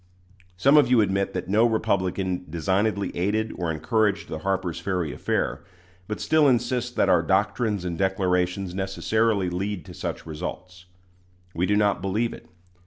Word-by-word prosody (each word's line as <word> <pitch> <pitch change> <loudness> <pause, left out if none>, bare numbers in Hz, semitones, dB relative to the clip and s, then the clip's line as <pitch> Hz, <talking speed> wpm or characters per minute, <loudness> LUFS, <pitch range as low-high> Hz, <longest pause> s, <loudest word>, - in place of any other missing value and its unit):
Some 140 +10 +5
of 145 - +5
you 125 -2 +5
admit 100 -1 +1
that 90 -1 -4
no 105 +4 +3
Republican 95 -5 -1
designedly 95 +5 0
aided 110 +5 0
or 85 -2 -2
encouraged 100 +6 0
the 80 - -4
Harper's 90 -1 -2
Ferry 90 -4 -2
affair, 65 +4 -2 0.4
but 105 - -4
still 155 -2 +3
insist 125 -1 0
that - - +2
our - - +4
doctrines 105 -6 0
and 85 -2 -4
declarations 95 -1 0
necessarily 100 +2 0
lead 95 +1 -3
to - - -10
such - - -5
results. 90 +3 -7 0.7
We 90 +3 0
do 105 - +2
not 105 -3 +2
believe 105 +5 -1
it. - - -13
95 Hz, 155 wpm, -25 LUFS, 90-110 Hz, 0.7 s, Some